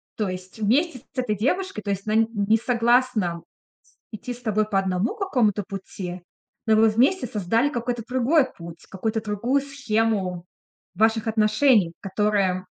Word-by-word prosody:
то 215 - -1
есть 185 +2 -7
вместе 255 +7 +1
с 250 - -27
этой 215 -5 -1
девушкой, 280 - -1
то 205 - -3
есть 195 0 -3
на 215 - -1
н 225 0 +4
не 210 +1 +2
согласна 235 -6 +1 0.5
с - - -32 0.2
идти 245 - -6
с 245 - -11
тобой 215 -2 +1
по 195 - +1
одному 190 - -1
какому-то 245 - +1
пути, 185 -2 -7 0.4
но 220 -1 +4
вы 220 +1 +5
вместе 250 - +2
создали 225 +4 0
какой-то 240 -3 -3
другой 260 +4 +3
путь, 170 -2 -11
какой-то 220 +3 -2
другую 225 +6 0
схему 220 -10 -1 0.5
ваших 220 0 +2
отношений, 215 -3 +3
которая, 195 -2 0
220 Hz, 155 wpm, -24 LUFS, 195-245 Hz, 0.5 s, вы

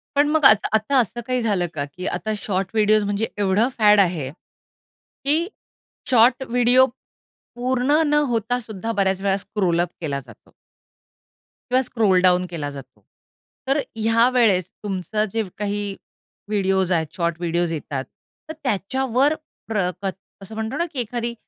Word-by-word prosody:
पण 290 +1 +4
मग 310 -1 +2
आता 215 -4 +6
आता 220 +6 +2
असं 240 +1 -1
काही 255 -1 0
झालं 200 -6 0
का? 145 -2 -3
की 180 +6 -9
आता 215 - -2
शॉर्ट 190 -2 -2
व्हिडिओस, 215 -1 +3
म्हणजे 205 +2 -1
एवढं 205 +4 +2
फॅड 210 -2 +6
आहे, 170 -8 +1 1.0
की 315 +5 +2 0.6
शॉर्ट 250 +1 +4
व्हिडिओ 245 +2 +5 0.7
पूर्ण 255 +5 +1
न 295 - +1 0.2
होता 235 +1 0
सुद्धा 220 -2 -5
बऱ्याच 195 -3 0
वेळा 195 0 +1
स्क्रोल 190 -4 -1
अप 175 - 0
केला 140 -4 -2
जातो. 120 -5 -17 1.2
किंवा 255 +1 +4
स्क्रोल 220 -7 +2
डाउन 180 0 +4
केला 160 -4 -4
जातो. 140 -2 -12 0.7
तर 275 - +2 0.2
ह्या 225 +2 +3
वेळेस 220 -8 +3 0.2
तुमचं 205 +1 -1
जे 225 -1 0
काही 205 -1 -2 0.5
व्हिडिओस 190 -3 +1
आहेत, 165 -2 +2
शॉर्ट 170 -1 0
व्हिडिओस 170 0 0
येतात, 145 -4 -4 0.4
तर - - -4
त्याच्यावर 260 - +1 0.3
प्र 205 -5 0
कत 195 -1 -2 0.3
असं 205 +3 -10
म्हणतो 220 +5 -3
ना 340 - +1
की 260 - -4
एखादी 235 0 -3
210 Hz, 150 wpm, -22 LUFS, 185-240 Hz, 1.2 s, आता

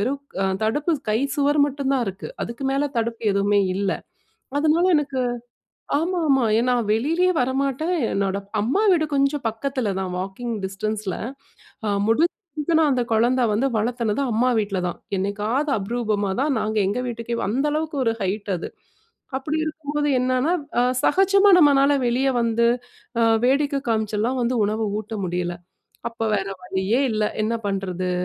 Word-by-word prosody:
வெறும் 270 +6 -1 0.4
தடுப்பு 295 +9 +1 0.2
கை 215 - +2 0.2
சுவர் 290 0 +2
மட்டும் 275 -1 -2
தான் 250 -3 +1
இருக்கு. 195 +1 -7
அதுக்கு 235 +4 -5
மேல 285 +1 +1
தடுப்பு 230 0 -2
எதுவுமே 200 +1 +3 0.2
இல்லை. 195 -1 0 0.6
அதனால 315 +4 +3
எனக்கு 280 -3 -1 0.8
ஆமாமா 320 -7 +2
ஏ - - +2
நான் 240 -4 +1
வெளியிலேயே 330 +10 +2
வரமாட்டேன். 275 +6 0 0.2
என்னோட 195 0 0 0.3
அம்மா 275 - +1
வீடு 315 -2 +1
கொஞ்சம் 275 -1 +1
பக்கத்தில 245 -3 -2
தான் 185 -1 -4
வாக்கிங் 210 +5 -4
டிஸ்டன்ஸ்ல 200 0 -3 0.7
அ - - +1 0.2
முடிஞ்ச 310 +10 +3 0.6
அந்த 255 -2 +2
குழந்தை 240 +3 +3
வந்து 215 +6 +1
வளர்த்தினது 230 +1 0
அம்மா 235 +3 +2
வீட்ல 205 -3 -1
தான். 175 - -3 0.2
என்னைக்காவது 210 +9 -1
அபூர்வமா 210 -1 -1
தான் 285 -1 +1
நாங்க 215 0 -2
எங்க 205 +5 -1
வீட்டுக்கே 235 0 -4
அந்த 265 +7 0
அளவுக்கு 310 -1 -2
ஒரு 225 - +2
ஹைட் 200 +2 -2
அது. 170 - -5 0.7
அப்படி 295 +4 -2
இருக்கும்போது 295 -1 -2
என்னன்னா, 255 +5 +1 0.3
அ - - +4 0.2
சகஜமா 390 +4 +4
நம்மனாள 285 -3 +5
வெளியே 260 +3 +2
வந்து, 235 0 +2 0.5
அ - - +3 0.2
வேடிக்கை 280 +2 +2
அ - - -37
காமிச்செல்லாம் 220 +3 0
வந்து 245 +1 0
உணவு 215 +2 -1
ஊட்ட 220 +1 -7
முடியல. 175 0 -2 0.5
அப்போ 230 -1 -5
வேறு 195 -1 -1
வழியே 190 +6 0
இல்லை. 215 -1 +1
என்ன 225 +2 0
பண்ணுறது 185 -2 -2
240 Hz, 145 wpm, -23 LUFS, 210-280 Hz, 0.8 s, நம்மனாள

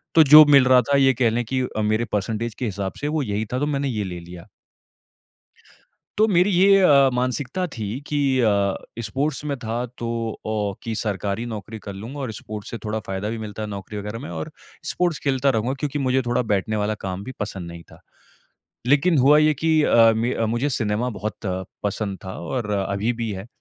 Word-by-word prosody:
तो 160 - +8
जो 155 0 +12
मिल 140 -3 +6
रहा 125 -1 +6
था, 140 +2 +1
ये 135 -1 +5
कह 120 -1 +2
लें 120 +2 -1
कि 130 +3 -1
अ, 110 -4 -3
मेरे 110 +2 +1
परसेंटेज 110 +3 -2
के 125 - -4
हिसाब 100 -3 -3
से 145 - -1
वो 150 -1 0
यही 105 -2 -2
था, 125 - 0
तो 145 - 0
मैंने 140 -1 -1
ये 105 -4 -2
ले 90 -2 -6
लिया। 85 0 -11 1.7
तो 215 - +4
मेरी 180 -1 +3
ये 195 +2 +5
अ, 140 -6 +6
मानसिकता 130 +7 -1
थी 110 +2 -4
कि 145 -1 0 0.2
अ, 100 -4 +2 0.3
स्पोर्ट्स 140 +7 -2
में 140 -2 -2
था 115 +2 -3
तो 120 - -4 0.4
ओ 105 -2 -1
कि 115 -1 -3
सरकारी 105 +1 -2
नौकरी 110 -1 -7
कर 100 -1 -8
लूँगा 115 +9 -8
और 130 -5 -3
स्पोर्ट्स 105 -1 -8
से 115 - -4
थोड़ा 110 +1 -2
फ़ायदा 95 +2 -3
भी 115 - -3
मिलता 110 -1 -7
है 105 - -4
नौकरी 100 +1 -7
वग़ैरह 105 +2 -5
में - - -8
और 80 -2 -5 0.3
स्पोर्ट्स 175 -4 0
खेलता 140 0 +2
रहूँगा 120 +1 0
क्योंकि 145 0 -2
मुझे 130 -1 +1
थोड़ा 120 +1 +1
बैठने 100 +2 -1
वाला 105 0 0
काम 95 +1 -4
भी 130 - -7
पसंद 100 -4 -5
नहीं 85 0 -10
था। - - -15 0.9
लेकिन 145 +5 +4
हुआ 140 +3 +6
ये 155 0 +4
कि 160 +2 +2
अ, 115 -5 +6
मे 115 +3 0
अ, 115 - -1
मुझे 120 +6 0
सिनेमा 115 -1 -1
बहुत 105 -4 -5 0.5
पसंद 100 -1 -2
था 95 - -6
और 105 +4 -3
अभी 100 +3 -1
भी 115 -2 -3
है। 95 +2 -7
115 Hz, 210 wpm, -23 LUFS, 105-135 Hz, 1.7 s, जो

